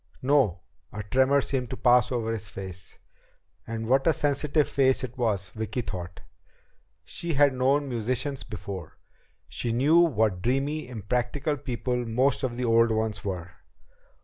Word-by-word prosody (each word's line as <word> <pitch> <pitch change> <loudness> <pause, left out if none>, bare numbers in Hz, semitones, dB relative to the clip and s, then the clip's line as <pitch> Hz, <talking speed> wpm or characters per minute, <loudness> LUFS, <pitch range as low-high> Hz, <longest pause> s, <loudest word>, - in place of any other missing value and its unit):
"No." 135 -9 +2 0.3
A 105 0 -5
tremor 130 +6 +3
seemed 130 -4 -2
to 130 - -5
pass 125 0 +4
over 115 -2 -1
his 110 -2 -5
face. 95 -2 -9 0.7
And 115 0 -4
what 135 +4 +3
a 165 - +5
sensitive 145 +1 +1
face 130 -1 +2
it 125 -1 -5
was, 105 -6 -1
Vicki 110 +5 -4
thought. 90 -5 -7 0.8
She 170 -2 -4
had 140 -1 +5
known 135 +3 +2
musicians 125 +3 -2
before. 95 -6 -7 0.5
She 120 - -3
knew 140 +8 +4
what 110 - +2
dreamy, 135 +6 -1
impractical 125 +6 -2
people 125 -2 -3
most 130 +4 +1
of 120 -3 -2
the 125 - -1
old 115 0 +4
ones 110 -2 -1
were. 90 -3 -4
125 Hz, 150 wpm, -27 LUFS, 110-135 Hz, 0.8 s, a